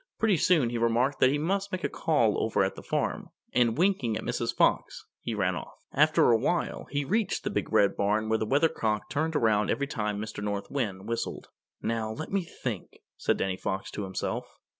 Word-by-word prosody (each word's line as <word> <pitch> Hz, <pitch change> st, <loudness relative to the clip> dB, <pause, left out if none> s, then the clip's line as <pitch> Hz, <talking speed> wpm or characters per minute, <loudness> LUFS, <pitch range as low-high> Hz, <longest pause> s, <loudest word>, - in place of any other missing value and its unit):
Pretty 215 Hz, -5 st, +3 dB
soon 150 Hz, -7 st, +3 dB
he 120 Hz, -, -2 dB
remarked 120 Hz, +4 st, +2 dB
that 130 Hz, -, +6 dB
he 145 Hz, -, +1 dB
must 195 Hz, +6 st, -1 dB
make 185 Hz, -1 st, -3 dB
a -, -, +2 dB
call 120 Hz, -10 st, +1 dB
over 110 Hz, -3 st, +2 dB
at 95 Hz, -, 0 dB
the -, -, -10 dB
farm, -, -, -2 dB, 0.2 s
and 120 Hz, -1 st, +3 dB
winking 160 Hz, -, +2 dB
at -, -, -6 dB
Mrs. -, -, -1 dB
Fox, -, -, +1 dB, 0.2 s
he -, -, -3 dB
ran -, -, +1 dB
off. -, -, -7 dB, 0.2 s
After -, -, +5 dB
a 115 Hz, -, +5 dB
while 170 Hz, +8 st, -1 dB
he 145 Hz, 0 st, -1 dB
reached 215 Hz, +6 st, 0 dB
the 210 Hz, -, -2 dB
Big -, -, -2 dB
Red 105 Hz, -2 st, +4 dB
Barn 105 Hz, +2 st, +1 dB
where 110 Hz, 0 st, +1 dB
the 110 Hz, -, -1 dB
Weathercock 115 Hz, -6 st, +1 dB
turned 160 Hz, +2 st, -1 dB
around 110 Hz, -6 st, +3 dB
every 140 Hz, -, +1 dB
time 105 Hz, -7 st, -2 dB
Mr. 110 Hz, -1 st, -5 dB
North 100 Hz, -1 st, -3 dB
Wind 105 Hz, -8 st, -2 dB
whistled. 115 Hz, 0 st, -3 dB, 0.3 s
"Now, 115 Hz, -1 st, -1 dB
let 155 Hz, +7 st, -6 dB
me 195 Hz, 0 st, +2 dB
think," 125 Hz, -, -6 dB, 0.2 s
said -, -, 0 dB
Danny 95 Hz, -1 st, -1 dB
Fox 95 Hz, +1 st, -3 dB
to 105 Hz, -, -4 dB
himself. 95 Hz, -1 st, -4 dB
115 Hz, 205 wpm, -28 LUFS, 105-155 Hz, 0.3 s, that